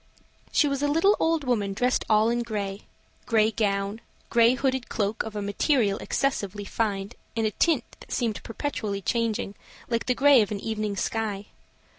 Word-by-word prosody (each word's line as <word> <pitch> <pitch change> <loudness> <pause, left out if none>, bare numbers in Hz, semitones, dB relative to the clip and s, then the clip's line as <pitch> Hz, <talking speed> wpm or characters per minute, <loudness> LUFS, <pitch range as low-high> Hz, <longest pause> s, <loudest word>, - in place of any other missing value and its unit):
She 300 - +4
was 280 -1 -1
a 290 - +2
little 330 +8 +4
old 325 -2 +1
woman 215 -6 0
dressed 250 +5 +1
all 215 +1 +4
in 240 0 0
gray: 205 -4 -4 0.4
gray 220 -1 +3
gown; 200 0 -1 0.3
gray 235 +1 +5
hooded 265 -1 -1
cloak, 210 +1 -1
of 220 -1 -6
a 205 - -2
material 205 0 +1
excessively 205 -7 -1
fine, 200 -2 -2 0.3
and 225 - +1
a 215 - +1
tint 330 - +2 0.2
that - - -14
seemed 230 -4 -1
perpetually 215 -6 -4
changing, 225 -2 -1 0.4
like 230 -1 -1
the 250 - +2
gray 280 -2 +6
of 205 - 0
an 210 - -3
evening 215 -1 -2
sky. 210 -1 -2
220 Hz, 170 wpm, -26 LUFS, 205-250 Hz, 0.4 s, gray